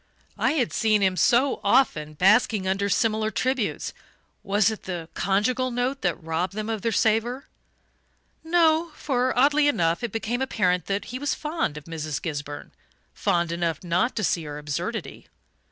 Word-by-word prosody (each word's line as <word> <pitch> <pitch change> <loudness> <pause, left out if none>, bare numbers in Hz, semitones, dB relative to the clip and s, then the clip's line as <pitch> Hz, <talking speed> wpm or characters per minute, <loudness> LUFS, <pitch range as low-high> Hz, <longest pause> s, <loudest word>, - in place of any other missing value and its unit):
I - - +2
had 260 -7 0
seen 215 -2 +2
him, 190 -1 +2
so 245 - +3
often, 155 - +2
basking 200 +2 +3
under 195 +2 0
similar 215 +2 +1
tributes 255 0 -1 0.5
was 205 +2 +2
it 220 - -8
the 175 -3 -5
conjugal 235 +7 +1
note 250 +3 -2
that 175 -3 +1
robbed 165 +3 -2
them 215 +2 -3
of 220 -2 -3
their 230 - 0
savour? 225 +5 +1 1.0
No 325 -1 +2
for, 255 -2 0
oddly 290 +3 +4
enough, 170 -7 +1
it 240 - -2
became 230 +2 -2
apparent 185 -8 0
that 200 +1 -2
he 255 - -3
was 290 +1 -1
fond 300 - -2
of 150 - -8
Mrs. 155 -2 -4
Gisburn 145 -4 -6 0.4
fond 175 -4 0
enough 170 -1 -2
not 180 +8 0
to 215 - -2
see 170 - +1
her 145 0 -6
absurdity. 170 +10 -5
215 Hz, 160 wpm, -25 LUFS, 175-250 Hz, 1.0 s, oddly